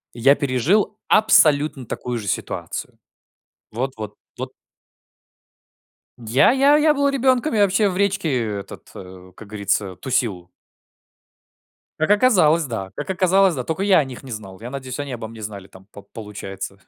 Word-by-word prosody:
Я 135 +4 +4
пережил 145 - +1
абсолютно 150 - +4
такую 125 +2 -4
же 105 -3 -6
ситуацию. - - -4 0.7
Вот 130 +4 -3
вот 105 -1 -7 0.2
вот. - - -5 1.7
Я 120 - +3
я 275 +3 +4
я 305 0 +4
был 280 -1 +1
ребенком, 260 +1 +1
я 215 - +2
вообще 200 +2 +2
в 180 - -4
речке 155 - 0
этот, 100 - -11
э, 95 0 -12
как 110 - -12
говорится, 100 -2 -2
тусил. 100 -9 -2 1.5
Как 155 - 0
оказалось, 180 -9 +4
да. 110 -7 -5
Как 145 - -6
оказалось, 190 0 +3
да. 130 - -3
Только 165 +8 -3
я 195 -2 +5
о - - +2
них 130 0 -10
не 130 - -10
знал. 100 -4 -8
Я 120 - -7
надеюсь, 130 -1 -6
они 145 -2 -4
обо 115 -2 -6
мне 115 0 -11
знали 100 -2 -7
там, 95 0 -17
по 100 - -11
получается. 100 -2 -8
130 Hz, 155 wpm, -21 LUFS, -, 1.7 s, я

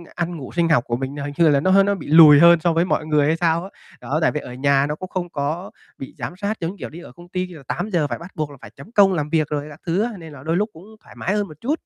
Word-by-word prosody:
ăn, 175 -1 -3
ngủ, 135 - -8
sinh 170 -1 +2
học 125 -6 +3
của 120 - -1
mình 135 +2 -5
nó 145 - -5
hình 145 - -5
như 165 -2 +5
là 140 -1 +3
nó 185 +6 +1
h 195 +1 +6
nó 200 0 +1
bị - - -9
lùi 150 -2 +8
hơn 170 0 +7
so 170 +1 +1
với 170 +2 +2
mọi 155 - -1
người 150 -2 +2
hay 160 - +2
sao 170 0 +1
á, 195 - -8 0.3
đó, 135 +6 -2
tại - - +3
vì 150 - -3
ở 125 - -9
nhà 140 +1 +2
nó 150 - -3
cũng 185 +3 -8
không 175 -2 -4
có 155 +5 -4 0.3
bị 135 - -9
giám 175 - -6
sát 205 +2 -3
giống 165 +1 -2
như, - - -12
kiểu, - - -6
đi 165 - -11
ở - - -12
công 175 0 -16
ty 185 0 -3
là 160 -6 -12
8:00 175 -8 -1
phải 120 -3 -4
bắt 175 +3 -11
buộc 155 -2 -3
là 140 - -13
phải - - -11
chấm 140 +11 -13
công 200 -4 +5
làm 150 -3 -2
việc 155 -2 +1
rồi 150 0 -3
các 150 - -13
thứ 175 +4 0
á, 240 - -2
nên 160 -3 -11
là 130 -2 -12
đôi 165 +3 -1
lúc 210 +3 0
cũng 165 +4 -14 0.2
thoải - - -16
mái 190 - -2
hơn 205 -1 -1
một 155 - -12
chút. 300 +6 -1
165 Hz, 340 wpm, -21 LUFS, 145-180 Hz, 0.3 s, lùi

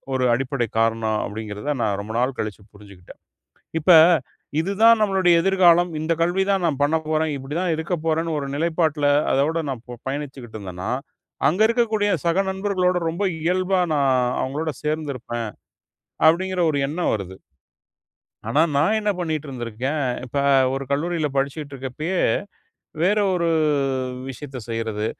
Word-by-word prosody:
ஒரு 130 -1 +1
அடிப்படை 130 -1 -2
காரணம். 110 -1 +1
அப்டிங்கிறத 105 +6 -4
நான் 100 -2 0
ரொம்ப 110 +2 -7
நாள் 125 +1 0
கழிச்சு 105 -1 -4
புரிஞ்சுகிட்டேன். 100 -3 -15 0.6
இப்ப, 180 +4 +5 0.7
இதுதான் 220 +5 +4
நம்மளுடைய 190 -4 +3
எதிர்காலம், 175 -2 +4
இந்த 165 +1 0
கல்வி 185 +3 +1
தான் 190 -2 0
நான் 145 -4 -1
பண்ணப்போறேன், 155 0 0
இப்டி 135 +3 -6
தான் 180 -3 0
இருக்க 160 +3 -2
போறேன்னு, 160 0 0
ஒரு 140 - -5
நிலைப்பாட்டுல 160 -2 +1 0.2
அதோடு 160 +4 +1
நான் 125 -3 -6
பொ 125 - -6
பயணிச்சுக்கிட்டு 135 -5 -6
இருந்தேன்னா, 95 -2 -6 0.6
அங்கருக்கக்கூடிய 220 - +2 0.2
சக 170 +3 +2
நண்பர்களோட, 190 -2 0
ரொம்ப 170 +5 -2 0.2
இயல்பா 185 +3 +1 0.2
நான் 140 -2 +2 0.3
அவங்களோட 150 +4 -2
சேர்ந்திருப்பேன். 135 -7 -3 0.8
அப்டிங்கிற 185 +3 +1
ஒரு 145 - -1
எண்ணம் 170 +4 -1
வருது. 95 -3 -6 1.1
ஆனா, 145 +7 +3
நான் 160 +10 +3
என்ன 210 - -1
பண்ணிக்கிட்டு 155 -4 -3
இருந்திருக்கேன். 125 +4 -3 0.2
இப்ப, 135 +3 -3 0.3
ஒரு 135 0 -2
கல்லூரியில 160 +2 0
படிச்சுக்கிட்டு 140 +1 -2
இருக்கப்பயே, 135 +8 -4 0.9
வேற 205 +4 +3
ஒரு 170 -2 0 0.8
விஷயத்த 135 0 -7
செய்யறது. 110 -2 -2
150 Hz, 130 wpm, -22 LUFS, 125-175 Hz, 1.1 s, இப்ப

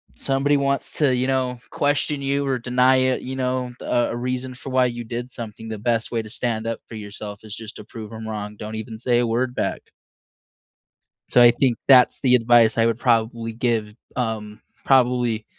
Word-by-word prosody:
Somebody 140 +1 +1
wants 140 0 -1
to, 145 -4 +3
you 125 +1 0
know, 130 -2 -1
question 145 0 0
you 140 0 0
or 130 -1 +1
deny 125 +2 +3
it, 130 0 +1
you 130 +1 -5
know, 125 -1 -2
a 120 -1 +1
a - - -3
reason 125 +1 -3
for 135 - -8
why 130 -1 +4
you 120 -1 -3
did 120 +2 -6
something, 115 -2 -8
the 110 - -4
best 115 +1 -1
way 115 -1 0
to 110 - -11
stand 115 0 -2
up 115 -1 -3
for 115 - -9
yourself 105 0 -8
is 110 - -9
just 110 -1 -9
to - - -9
prove 110 0 -9
'em 110 0 -7
wrong, 105 -1 -5
don't 110 +1 -6
even 110 0 -6
say 120 0 +2
a 120 - +1
word 120 +2 0
back. - - -3 1.4
So, 125 - +5
I 120 0 +9
think 120 -1 +1
that's 125 -2 +6
the 125 -2 +5
advice 115 -1 +4
I 115 - +4
would 115 -1 +1
probably 115 -1 +1
give, 110 -2 -1 0.2
um, 110 -3 -3 0.2
probably, 125 -4 +2
120 Hz, 200 wpm, -22 LUFS, 110-130 Hz, 1.4 s, I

